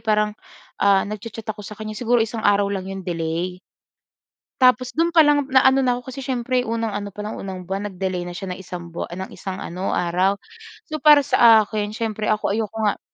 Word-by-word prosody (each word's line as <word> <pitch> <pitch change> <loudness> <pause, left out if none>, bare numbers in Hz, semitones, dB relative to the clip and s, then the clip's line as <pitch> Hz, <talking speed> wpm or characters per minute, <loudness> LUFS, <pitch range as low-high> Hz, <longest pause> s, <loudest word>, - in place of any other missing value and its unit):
Parang, 210 -1 +1 0.5
ah 200 -1 +4
nagcha-chat 215 +2 -7
ako 215 -1 -5
sa 210 +1 -9
kaniya. 215 0 -6
Siguro 240 -1 +2
isang 225 0 -5
araw 200 -1 +3
lang 190 -1 -4
'yong 195 -1 -6
delay. 170 +1 -3 1.0
Tapos 255 -1 +4
do'n 335 +3 0
pa 320 - +8
lang 290 -2 +3
na-ano 265 0 +5
na 250 -2 +2
ako 250 +1 -8
kasi 275 - -8
siyempre 250 -2 -1
unang 230 -1 -1
ano 205 -1 -5
palang, 210 +1 -5
unang 190 -2 -6
buwan 195 +3 -3
nag-delay 185 -2 -3
na 175 - -7
siya 195 -1 -5
ng 180 - -6
isang 175 -2 -8
buwa 170 - -4
ng 185 +2 -7
isang 190 -2 -6
ano, 185 0 -3
araw. 180 +3 +1 0.5
So 310 0 -5
para 295 -2 +7
sa 225 -3 +6
akin, 210 0 -4
siyempre 220 -2 -3
ako 215 -2 +1
ayoko 220 +1 -2
nga 210 - +1
210 Hz, 200 wpm, -22 LUFS, 190-240 Hz, 1.0 s, pa